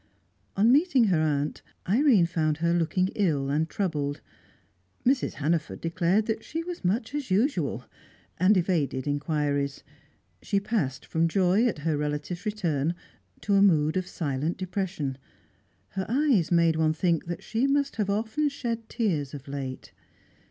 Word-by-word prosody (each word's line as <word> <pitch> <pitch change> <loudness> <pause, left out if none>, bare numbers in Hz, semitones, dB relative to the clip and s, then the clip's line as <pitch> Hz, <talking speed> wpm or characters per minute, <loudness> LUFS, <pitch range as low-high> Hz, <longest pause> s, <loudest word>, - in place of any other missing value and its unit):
On 220 +4 +5
meeting 285 -2 +4
her 160 - +3
aunt, 150 -1 -1 0.3
Irene 225 - +4
found 155 -3 0
her 170 +1 +1
looking 175 +2 +1
ill 145 -9 0
and 155 +3 0
troubled. 150 -7 -2 0.9
Mrs. 260 +1 +2
Hannaford 155 +1 -1
declared 175 +5 +1
that 220 -1 -2
she 325 +1 -4
was 350 - -7
much 220 +7 0
as 290 -5 -3
usual, 185 - 0 0.5
and 190 +3 +5
evaded 160 -7 0
inquiries. 145 -1 -1 0.6
She 200 - 0
passed 195 - -2
from 165 +1 +1
joy 190 +6 +3
at 230 - -1
her 155 -2 +1
relatives' 150 +6 -3
return 170 -7 -1 0.5
to 205 - 0
a 195 - +5
mood 155 -6 +4
of 185 -1 -1
silent 150 +1 -2
depression; 180 -7 -3 0.7
her 190 -1 -4
eyes 245 - +2
made 170 -2 +4
one 155 -1 +2
think 165 +1 0
that 175 - -5
she 235 +4 0
must 280 -1 0
have 205 -2 0
often 220 +9 0
shed 235 -5 -4
tears 155 - -1
of 140 -1 -10
late. 135 -2 -6
175 Hz, 150 wpm, -27 LUFS, 150-215 Hz, 0.9 s, On